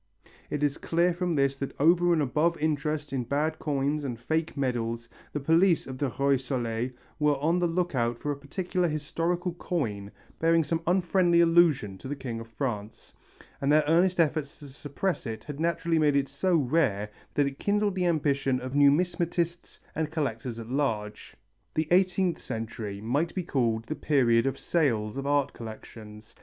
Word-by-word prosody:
It 150 0 -2
is 145 -1 0
clear 170 +1 +1
from 175 0 -1
this 140 -2 +1
that 140 0 -6
over 175 +4 +4
and 160 -3 +3
above 155 +5 +1
interest 150 -1 -1
in 130 -2 0
bad 150 +6 -1
coins 145 0 -1
and 120 -5 -4
faked 160 +4 -2
medals 115 -3 -2 0.2
the 150 - -2
police 165 +4 +3
of 130 -1 -7
the 140 -3 0
Roi 140 0 +4
Soleil 125 -2 -2 0.3
were 150 -1 +3
on 165 +5 +1
the 175 - +2
look 175 0 -1
out 120 -2 0
for 145 - -3
a - - -2
particular 175 +5 -2
historical 165 +3 -2
coin 110 - -3 0.3
bearing 165 0 +3
some 165 +3 -1
unfriendly 175 -1 +3
allusion 165 - +4
to - - -8
the 145 - -3
King 120 -5 -5
of 115 - -9
France, 110 -3 -5 0.5
and 140 +1 +2
their 155 0 +5
earnest 175 +4 +3
efforts 155 -1 +1
to 145 -2 -11
suppress 145 +6 -3
it 110 -1 -5
had 145 -1 -7
naturally 170 0 +1
made 150 -2 +3
it 140 -1 +2
so 175 +7 0
rare 125 -9 +1 0.2
that 145 - +3
it 140 0 -4
kindled 205 0 +1
the 180 -1 0
ambition 140 -5 +1
of 130 +1 -6
numismatists 170 +4 +1 0.2
and 160 -1 -2
collectors 125 -7 -3
at 115 -1 -7
large. 110 -7 -2 0.4
The 155 0 0
eighteenth 185 -1 +2
century 110 -4 -5
might 145 +10 -1
be 185 - -1
called 115 -8 0
the 155 - -4
period 125 -6 +2
of 135 - -1
sales 115 -11 0
of 135 +1 -4
art 145 -1 +1
collections. 110 -1 -10
145 Hz, 175 wpm, -28 LUFS, 125-170 Hz, 0.5 s, their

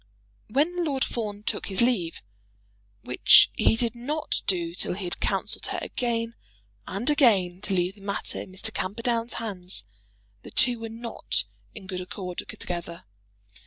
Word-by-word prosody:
When 320 +9 +1
Lord 275 -5 +1
Fawn 210 -3 -3
took - - -2
his 190 -2 -1
leave, 230 -9 +1 0.8
which - - +7
he - - +4
did 230 -1 +1
not 290 +6 -2
do 170 -3 +1
till 180 - 0
he 200 - -5
had 175 - -2
counselled - - 0
her - - -1
again 230 -2 -2 0.5
and 200 +6 -3
again 200 - +4
to 200 -2 -1
leave 180 +1 +1
the 200 - -18
matter 200 0 -3
in - - -9
Mr. 185 - -3
Camperdown's 230 +4 -1
hands, 185 - -4 0.6
the - - -10
two 245 -2 +4
were 225 0 -5
not 230 +1 -1 0.3
in 210 -4 -9
good 185 -1 -4
accord 180 -1 -5
together. 170 -1 -5
210 Hz, 155 wpm, -27 LUFS, 185-240 Hz, 0.8 s, which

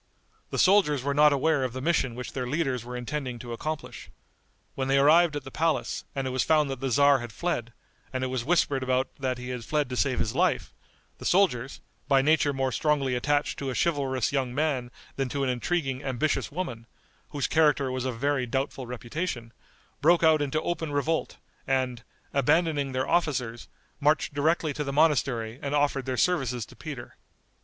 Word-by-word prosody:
The - - -4
soldiers 185 -9 +4
were 140 +1 0
not 150 +1 +6
aware 145 0 +2
of 130 -2 -2
the 130 - -4
mission 130 -5 0
which 125 0 -6
their 125 -2 -3
leaders 135 -4 -1
were 125 +1 -6
intending 125 0 -4
to 120 0 -7
accomplish. 155 +6 -5 0.6
When 130 -1 -2
they 135 +1 +3
arrived 155 +3 +5
at 145 - -4
the 135 - -9
palace, 160 +1 -1
and 135 -1 -2
it 130 - -2
was 130 0 0
found 150 -3 +3
that 135 - -5
the 135 - -2
tzar 140 +2 +5
had 120 -1 -7
fled, 120 -3 -2 0.4
and 130 -1 -2
it 130 - -2
was 130 -2 -2
whispered 145 -2 +2
about 130 0 0
that 130 -2 -1
he 125 0 -7
had 125 -2 -4
fled 150 +1 -1
to 125 - -3
save 130 0 +1
his 110 - -1
life, - - +1 0.5
the - - -10
soldiers, 140 -10 +1 0.3
by 135 -1 +4
nature 150 0 +3
more 135 -1 -1
strongly 140 +1 +1
attached 145 +4 0
to 140 - -3
a 130 - -3
chivalrous 135 -6 0
young 130 -3 -1
man 140 -5 0 0.3
than 135 -2 -1
to 140 +2 -2
an 130 - +1
intriguing, 135 +1 -2
ambitious 135 +3 -1
woman, 130 -9 -5 0.4
whose 145 -3 -2
character 150 -4 +3
was 130 -1 -2
of 130 -3 -3
very 140 0 0
doubtful 135 0 -3
reputation, 120 0 -4 0.5
broke 170 +3 +4
out 160 -2 +5
into 145 +1 0
open 160 -3 -2
revolt, 150 +3 -1 0.3
and, 130 -2 0 0.3
abandoning 145 -1 +2
their 130 +1 -1
officers, 125 -9 0 0.3
marched 150 +1 +2
directly 155 +1 +1
to 150 - -3
the 140 - -3
monastery 135 -6 +1
and 140 +1 -2
offered 145 -2 +1
their 130 -1 -1
services 125 -7 +1
to - - -16
Peter. - - -8
135 Hz, 190 wpm, -27 LUFS, 125-150 Hz, 0.6 s, not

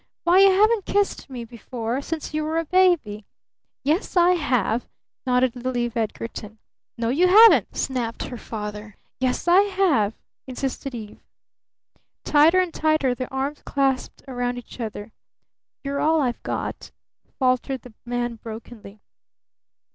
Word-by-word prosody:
Why, 350 +2 +5
you 390 0 +8
haven't 420 +2 +3
kissed 405 -6 0
me 245 -3 -6
before 235 +2 -5
since 315 +1 -5
you 310 0 -1
were 315 +1 -2
a 330 - 0
baby!" 340 - +2 0.6
"Yes, 315 +7 0
I 350 +1 +6
have!" 250 - 0 0.4
nodded 250 0 +2
little 250 0 -3
Eve 240 -1 -2
Edgarton. 220 -1 -4 0.4
"No, 230 0 -1
you 330 +9 +3
haven't!" 440 +5 +6
snapped 245 -4 -2
her 245 - -6
father. 210 -2 -7 0.2
"Yes, 255 +5 -1
I 355 +3 +7
have!" 375 - +1 0.3
insisted 265 0 -4
Eve. 215 -3 -9 1.0
Tighter 310 +5 +5
and 365 -3 0
tighter 310 -5 +1
their 255 0 -6
arms 275 +2 -3
clasped 270 -2 -1
round 245 -1 -2
each 245 +1 -11
other. 215 -2 -6 0.7
"You're 280 0 -3
all 320 +1 +3
I've 250 -5 -1
got," - - -4 0.5
faltered 255 -1 0
the 250 - -13
man 240 -1 -3
brokenly. 220 -2 -10
255 Hz, 140 wpm, -23 LUFS, 235-320 Hz, 1.0 s, you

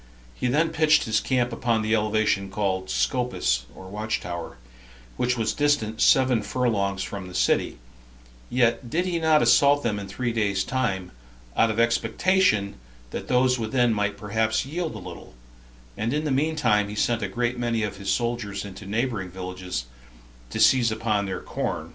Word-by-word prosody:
He 125 - -2
then 155 +6 +2
pitched 155 -1 +3
his 110 0 +1
camp 125 -2 0
upon 115 -1 0
the 110 +1 0
elevation 105 -2 +1
called 95 -2 -2
Scopus, 65 - 0
[or 95 - -11
watch 105 +3 -2
tower,] 85 -6 -6 0.6
which 125 0 0
was 110 -1 0
distant 145 -7 0
seven 130 -4 +4
furlongs 100 -4 -1
from 100 -2 -6
the 90 - -10
city; - - +1 0.7
yet 120 0 +1
did 175 +8 0 0.2
not 160 -1 +4
he - - +3
assault 145 0 +5
them 105 -3 -1
in 100 - -7
three 120 +5 -3
days' 100 -3 +1
time, 100 -9 -2 0.4
out 115 - +4
of 110 +1 -2
expectation 115 - +2 0.3
that - - -5
those 125 0 +3
within 115 +1 +1
might 105 -1 -1
perhaps 110 +2 0
yield 160 -1 -3
a - - -5
little; 95 - -10 0.6
and 115 +5 -1
in 150 - -1
the 150 - -1
mean 155 +4 +1
time 105 -7 +2
he 105 - -6
sent 115 +2 +1
out - - -1
a - - -12
great 120 0 -1
many 115 -2 0
of 105 -1 -3
his 100 0 -5
soldiers 115 -5 -1
into 100 0 -9
neighboring 110 -3 -2
villages, 90 -7 -5 0.6
to - - -4
seize 115 +1 +5
upon 110 -2 -1
their 95 -1 -4
corn. - - -4
110 Hz, 175 wpm, -25 LUFS, 100-125 Hz, 0.7 s, assault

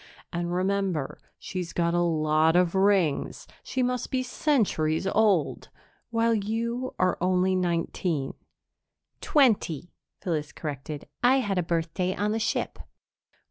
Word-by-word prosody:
"And, 175 0 -2
remember, 185 -5 -1 0.2
she's 185 -4 -5
got 170 -1 +1
a 175 - +2
lot 155 -1 +2
of 180 -1 +3
rings 190 -6 +1 0.2
she 260 - -2
must 250 -1 -1
be 255 -1 0
centuries 205 - +1
old 195 -6 +2 0.4
while 230 0 +2
you 230 +4 -2
are 185 -1 +1
only 185 +1 +2
nineteen." 170 -4 -1 0.9
"Twenty," 205 - +2 0.3
Phyllis 155 -4 -3
corrected. 145 -1 -6
"I 260 +2 +5
had 195 -6 -1
a - - +3
birthday 170 +2 -1
on 210 +1 0
the 220 - 0
ship." - - -1
185 Hz, 125 wpm, -27 LUFS, 165-215 Hz, 0.9 s, I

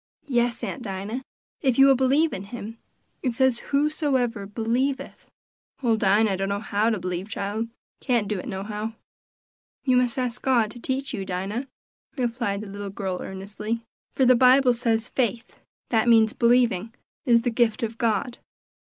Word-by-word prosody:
"Yes, 240 -3 0
Aunt 275 - -4
Dinah, 205 +3 -4 0.4
if 260 -5 +2
you 270 - +8
will 275 -1 +6
believe 275 +5 +2
in 195 - -5
him; 225 +1 -8 0.4
it 250 -4 -1
says 260 -1 +3
for - - -14
whosoever 275 -7 0
believeth." 240 +6 -2 0.6
"Ole 230 -2 +3
Dinah 205 -1 +3
dunno 195 +1 -1
how 210 +1 0
to 220 - 0
believe, 180 +1 -4
chile; 215 +2 -3 0.3
can't 240 -6 +1
do 210 -2 -2
it - - -7
nohow." 210 +3 -4 0.9
"You 255 -3 +3
must 250 -1 +1
ask 250 -2 -2
God 235 -5 +2
to 240 - -11
teach 265 +3 -3
you, 200 -5 -3
Dinah," 195 +8 -3 0.5
replied 235 -5 -1
the 215 - -7
little 200 0 -6
girl 190 -2 -4
earnestly, 210 +4 -5 0.3
"for 265 - +3
the 255 - +7
Bible 255 +1 +6
says 230 -1 0
'faith' 240 -2 -2 0.4
that 230 0 +3
means 225 -1 +5
believing 235 -3 +2 0.3
'is 235 -1 +5
the 245 - 0
gift 230 -1 +1
of 225 0 -3
God.'" 230 +1 0
230 Hz, 160 wpm, -25 LUFS, 205-250 Hz, 0.9 s, you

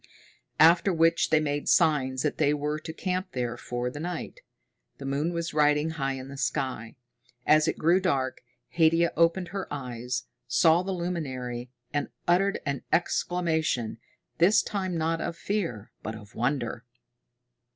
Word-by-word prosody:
After 170 +5 +6
which 165 -1 +3
they 155 - +4
made 145 -1 -1
signs 130 -4 +3
that 150 - -1
they 150 -1 +3
were 150 +1 -2
to 160 +1 -7
camp 185 +3 -3
there 120 -2 -2
for 120 +1 -3
the 145 - -7
night. 175 - -5 0.6
The 140 - -8
moon 140 +5 0
was 170 -1 -3
riding 150 +1 +3
high 135 -4 -2
in 130 0 -7
the 140 0 -9
sky. 130 -7 -2 0.5
As 155 +1 +5
it - - 0
grew 170 +4 +4
dark, 135 -9 -1 0.3
Haidia 165 0 +3
opened 170 +2 +2
her 195 -1 -5
eyes, 125 -3 -4 0.2
saw 160 +8 +4
the 190 +1 -3
luminary, 130 -9 -4 0.2
and 145 - -1 0.2
uttered 190 +3 +2
an 140 -3 -2
exclamation, 160 -10 0 0.4
this 180 +6 +5
time 190 -4 -2
not 165 +1 0
of 170 -1 -3
fear, 165 - -3
but 110 - -5
of 105 -1 -12
wonder. 120 -1 -1
155 Hz, 150 wpm, -27 LUFS, 130-170 Hz, 0.6 s, After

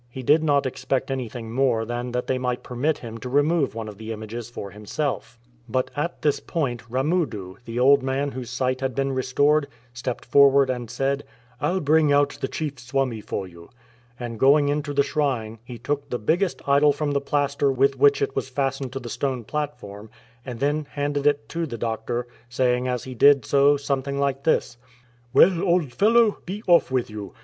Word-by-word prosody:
He 130 +2 -8
did 155 +5 +4
not 145 -3 +2
expect 130 +1 -2
anything 120 -3 -5
more 120 -3 +1
than 120 +1 -4
that 125 0 -2
they 130 - -1
might 125 -1 -2
permit 140 +5 -1
him 115 -1 -8
to 125 - -6
remove 145 0 +2
one 115 -1 -5
of 105 -1 -10
the 110 0 -6
images 110 +1 -6
for 100 -5 -7
himself. 120 +4 -4 0.3
But 130 +3 -1
at 170 +4 -3
this 145 -2 +2
point 125 -8 -2
Ramudu, 130 - -1
the 115 +1 -6
old 135 +3 +5
man 135 +2 -1
whose 125 -3 -6
sight 130 +1 -1
had 130 -3 -2
been 135 0 0
restored, 140 +3 +2 0.3
stepped 125 0 -5
forward 140 +1 +5
and 120 -3 -5
said, 140 +1 -1 0.2
" 125 0 -31
I'll 185 +1 0
bring 155 0 +3
out 145 0 +3
the - - 0
chief 145 -4 -4
Swami 130 -2 -2
for 95 -2 -4
you 85 -1 -14 0.2
"; 120 0 -33
and 120 -2 -6
going 145 +2 +5
into 145 0 -1
the 140 0 +3
shrine 130 -7 -2
he 120 -1 -9
shook 145 -1 -2
the 125 - -1
biggest 170 - -1
idol 140 +1 +5
from 145 0 -2
the 140 0 0
plaster 140 -1 +1
with 135 +1 +2
which 140 +1 +4
it 135 - -3
was - - -2
fastened 135 -1 -2
to 135 - -3
the 120 - -9
stone 130 0 -2
platform, 110 -7 -5 0.3
and 120 -2 -7
then 145 +2 0
handed 145 0 -1
it 145 0 +1
to 165 0 -2
the 120 - -6
doctor, 115 +2 -3 0.2
saying 125 0 +1
as 125 -2 -2
he 130 - -7
did 140 0 +5
so 140 +1 +4
something 140 0 -2
like 140 -1 -1
this: 120 -6 +1 0.2
— 125 +1 -31
" 120 0 -34
Well, 175 +4 +5
old 175 -8 +1
fellow, 220 - +4
be 205 +4 -5
off 175 -1 +5
with 130 -4 -1
you 105 -2 -8
135 Hz, 205 wpm, -24 LUFS, 120-145 Hz, 0.3 s, old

